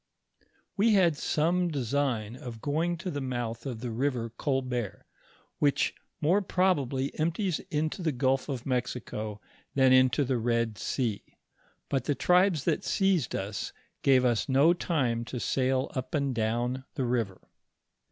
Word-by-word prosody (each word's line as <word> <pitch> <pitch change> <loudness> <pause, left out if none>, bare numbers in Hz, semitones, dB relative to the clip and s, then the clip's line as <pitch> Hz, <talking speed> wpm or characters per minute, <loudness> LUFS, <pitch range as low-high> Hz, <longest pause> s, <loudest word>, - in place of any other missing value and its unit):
We 215 +2 +4
had 175 -5 +4
some 170 +5 +1
design 130 -6 -1
of 120 -3 -8
going 160 +6 0
to 180 +2 -4
the 145 - -3
month 120 -2 -3
of 120 -4 -5
the 125 -2 -3
river 120 -1 -1
Oolburt, 125 -4 -2 0.6
which 145 -1 +2 0.3
more 175 +7 +3
probably 140 -9 +1
empties 170 +3 0
into 155 +1 -1
the 165 -3 +1
gulf 130 +2 0
of 130 -4 -4
Mexico 120 -4 -3 0.4
than 130 -1 +5
into 130 +2 +4
the 125 -1 0
Bed 115 -2 0
sea; 115 -6 -2 0.5
but 135 -3 -1
the 145 - +1
tribes 180 0 +3
that - - 0
seized 190 - +1
us, 100 +1 -4 0.3
gave 130 -2 +4
us 120 +1 +1
no 140 +6 +5
time 130 -10 0
to 125 +1 -5
sail 130 +1 0
up 130 +2 -3
and 140 -3 0
down 120 +3 -1
the 130 - -1
river. 115 -6 -2
130 Hz, 145 wpm, -29 LUFS, 120-155 Hz, 0.6 s, than